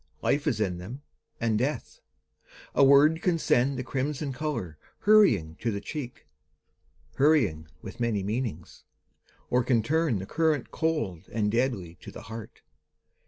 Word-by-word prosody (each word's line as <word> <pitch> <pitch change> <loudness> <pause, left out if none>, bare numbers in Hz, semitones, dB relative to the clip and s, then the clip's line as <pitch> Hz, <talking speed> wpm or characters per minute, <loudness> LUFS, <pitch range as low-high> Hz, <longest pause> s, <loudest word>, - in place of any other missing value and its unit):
Life 145 +2 +1
is 120 -7 +1
in 90 -5 -1
them, 120 +11 -8 0.4
and 110 -2 +1
death. 140 +5 -3 0.7
A - - +4
word 145 +4 +6
can 175 -3 +2
send 135 -3 +2
The 130 - -3
crimson 140 +2 -3
colour 120 - -4 0.2
hurrying 115 - +4
to 120 - 0
the 100 -2 -2
cheek. 130 +2 -7 0.9
Hurrying 120 - +3 0.2
with - - -9
many 115 -4 0
meanings; 105 -5 -4 0.7
or 125 0 +3
can 115 -3 +2
turn 160 -2 +1
The 95 - -5
current 155 0 0
cold 115 - -2
and 105 -2 0
deadly 110 -9 -1
to - - -9
the - - -10
heart. 115 -1 -9
125 Hz, 145 wpm, -27 LUFS, 105-150 Hz, 0.9 s, word